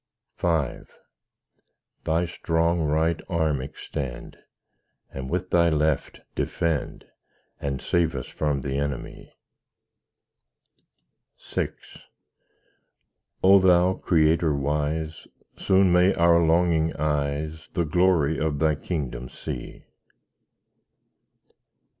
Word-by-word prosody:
V - - -2 1.6
Thy 80 +2 +1
strong 85 0 0
right 80 +2 +1
arm 80 -6 0
extend, 65 -1 -6 0.8
And 65 -1 -6
with 90 +3 -3
Thy 85 -1 +4
left 75 -2 0
defend, 80 -4 -2 0.5
And 70 -2 -3
save 85 +3 0
us 65 - -4
from 75 -3 -2
the 70 +1 -2
enemy. 70 -3 -5 2.2
VI - - +1 1.8
O 95 +1 +7
Thou 90 0 +4
Creator 80 -3 +2
wise, 75 +3 -2 0.3
Soon 95 -1 +3
may 90 +2 +4
our 85 0 +4
longing 80 -1 +2
eyes 75 +1 -2
The 85 -4 0
glory 80 -2 +2
of 80 -2 -1
Thy 80 +1 +2
kingdom 70 -6 -4
see. - - -8
80 Hz, 90 wpm, -25 LUFS, 75-85 Hz, 2.2 s, O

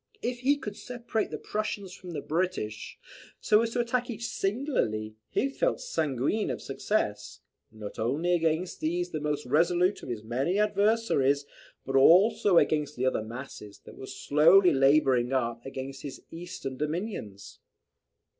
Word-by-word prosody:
If 245 0 -2
he 280 +3 +2
could 210 -7 -6
separate 235 -2 -3
the - - -5
Prussians 205 -3 -4
from 180 -2 -9
the 145 - -4
British, 160 - -3 0.4
so 210 +1 +4
as 230 - 0
to 245 - +1
attack 245 +1 -1
each 230 0 -5
singly, 195 - -1
he - - +1
felt - - -1
sanguine 155 - -1
of - - -3
success, 105 - -2 0.3
not 110 -1 -9
only 145 +11 0
against 165 +1 0
these 175 +3 -1
the 155 - -3
most 150 0 -2
resolute 175 +7 +2
of - - -9
his 115 -3 -4
many 130 - -1
adversaries, 205 -10 +2 0.4
but 135 - -3
also 180 +6 +5
against 150 -2 +2
the 130 - -1
other 130 - +1
masses, 110 -3 -9
that - - -12
were 130 - -9
slowly 165 +8 +5
labouring 135 -2 +3
up 120 -2 -1
against 135 0 -6
his 140 - -8
eastern 165 -6 -7
dominions. 150 - -5
160 Hz, 150 wpm, -28 LUFS, 130-205 Hz, 0.4 s, also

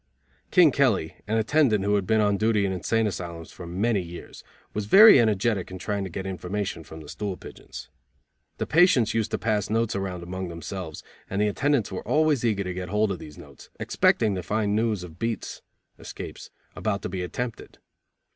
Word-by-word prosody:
King 175 -5 +6
Kelly, 110 - +1
an 110 +2 0
attendant 115 -3 +2
who 105 - +2
had 100 -2 +1
been 110 0 +3
on 105 -1 +2
duty 110 0 +2
in 95 - -1
insane 110 +5 0
asylums 85 -5 -5
for 85 - -10
many 100 +4 0
years, 85 0 -10 0.3
was 105 -1 -3
very 210 - +9
energetic 110 -3 +1
in 95 - -7
trying 100 +2 -3
to 95 - -5
get 95 +3 -5
information 95 -1 -4
from 80 +1 -11
the 75 - -12
stool 100 +3 -4
pigeons. - - -10 0.7
The - - -2
patients 155 - +4
used 110 -2 0
to - - -1
pass 105 -3 -1
notes 115 0 0
around 95 -3 -4
among 95 +1 -5
themselves, 85 -1 -7 0.3
and 100 - -2
the 105 - +3
attendants 135 +1 0
were 95 - -4
always 155 -4 +2
eager 105 -4 +1
to 90 -1 -4
get 90 0 -5
hold 105 +1 +1
of 95 - -4
those 75 -1 -11
notes, - - -14
expecting 110 -3 +2
to 95 - -3
find 105 +3 0
news 110 -4 0
of 80 -3 -11
beats 115 -2 -3 0.4
(escapes) - - -8 0.3
about 105 -2 -2
to - - -3
be 90 0 -4
attempted. 115 +6 -5
100 Hz, 195 wpm, -25 LUFS, 90-110 Hz, 0.7 s, very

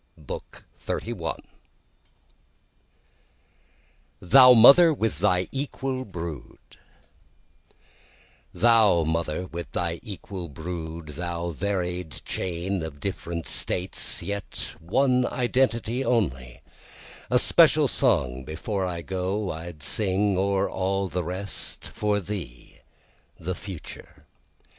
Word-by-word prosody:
BOOK - - -9 0.2
XXXI - - -3 2.8
Thou 125 +8 +8
Mother 140 +9 +9
with 110 - -1
Thy 90 -2 +2
Equal 135 -1 -3
Brood 85 - -7 1.1
1 - - -34 0.7
Thou 110 -7 +4
Mother 80 +2 -1
with 85 -1 -7
thy 85 -1 -1
equal 95 -3 -7
brood, 80 0 -6
Thou 85 +2 -4
varied 90 -2 -3
chain 90 +1 -3
of 80 -3 -7
different 85 -2 -4
States, 90 -1 -1
yet 100 +2 -4
one 125 +8 +2
identity 125 -1 0
only, 65 - -1 0.7
A - - +4
special - - +5
song 65 +1 +1
before 95 - -3
I 85 -2 -5
go 95 +3 -2
I'd 80 -1 -7
sing 100 +1 +2
o'er 95 +1 +1
all 95 0 -1
the 90 0 -2
rest, 95 +4 -3
For 105 -1 0
thee, 85 -11 -7 0.6
the 90 +3 -3
future. 95 -3 -10
90 Hz, 100 wpm, -25 LUFS, 85-105 Hz, 2.8 s, Mother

